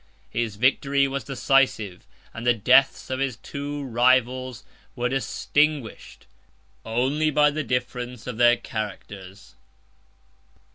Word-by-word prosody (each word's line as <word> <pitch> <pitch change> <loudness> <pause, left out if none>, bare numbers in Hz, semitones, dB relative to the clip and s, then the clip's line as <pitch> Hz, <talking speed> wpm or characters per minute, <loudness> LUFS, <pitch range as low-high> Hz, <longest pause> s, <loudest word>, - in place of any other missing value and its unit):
His 115 -3 -2
victory 140 +4 +2
was 135 0 -4
decisive; 130 -8 0 0.3
and 115 - -7
the 120 0 +3
deaths 130 +5 +3
of 130 - -2
his 135 -3 -1
two 145 +4 -6
rivals 130 0 +1 0.3
were 125 -1 -1
distinguished 135 +2 -1 0.6
only 130 +7 0
by 150 0 +3
the 155 +1 -3
difference 125 -2 -4
of 125 -3 -6
their 120 0 +5
characters. 100 -3 -8
125 Hz, 110 wpm, -24 LUFS, 115-135 Hz, 0.6 s, their